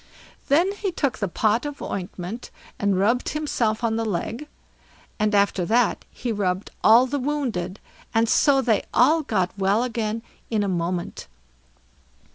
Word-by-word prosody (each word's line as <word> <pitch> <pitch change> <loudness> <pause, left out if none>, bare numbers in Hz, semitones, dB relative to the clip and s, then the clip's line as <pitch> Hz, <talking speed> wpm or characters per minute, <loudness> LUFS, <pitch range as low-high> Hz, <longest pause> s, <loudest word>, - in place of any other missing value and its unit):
Then 335 +8 +3
he 405 -1 -3
took 280 -8 -1
the 200 - 0
pot 215 +6 +1
of 290 -1 -5
ointment 185 +4 -5 0.3
and 200 -2 +1
rubbed 230 +6 +2
himself 240 -8 -1
on 225 -1 +1
the 225 - 0
leg, 225 - -3 0.7
and 215 0 +2
after 200 -2 +2
that 230 +3 +1
he 240 - -4
rubbed 190 -2 -1
all 230 +4 +7
the 280 +2 -2
wounded, 245 -10 -2 0.3
and 225 +1 +2
so 270 +2 +4
they 220 -5 +2
all 300 +7 +5
got 190 -10 0
well 200 +4 +2
again 230 -2 -2 0.3
in 215 -3 +1
a - - -1
moment. 175 -1 -3
225 Hz, 150 wpm, -24 LUFS, 200-255 Hz, 0.7 s, all